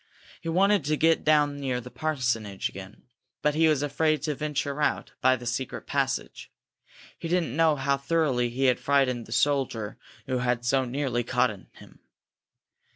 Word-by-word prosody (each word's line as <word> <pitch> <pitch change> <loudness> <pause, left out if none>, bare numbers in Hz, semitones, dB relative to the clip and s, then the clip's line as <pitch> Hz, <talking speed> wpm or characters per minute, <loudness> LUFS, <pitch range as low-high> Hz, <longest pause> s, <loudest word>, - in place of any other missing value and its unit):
He 165 - -4
wanted 195 +2 +3
to 155 +1 +1
get 165 +1 +3
down 150 -2 +3
near 130 -3 -1
the 125 +1 -10
parsonage 120 -10 -2
again, 95 +1 -11 0.4
but 150 - +3
he 160 +2 +3
was 150 -3 +2
afraid 155 0 +1
to 150 - 0
venture 145 0 -3
out - - 0
by 130 0 +5
the 120 -1 -9
secret 120 +2 -3
passage. - - -2 0.7
He 165 - -4
didn't 165 -7 0
know 160 -1 +4
how 140 0 0
thoroughly 140 -5 +1
he 125 +3 -3
had 125 -1 +3
frightened 130 -4 +1
the - - -13
soldier 125 -6 0 0.3
who 130 - -1
had 125 -1 -1
so 130 +1 +2
nearly 125 -1 -1
caught - - +1
him. - - -12
140 Hz, 165 wpm, -27 LUFS, 125-155 Hz, 0.7 s, by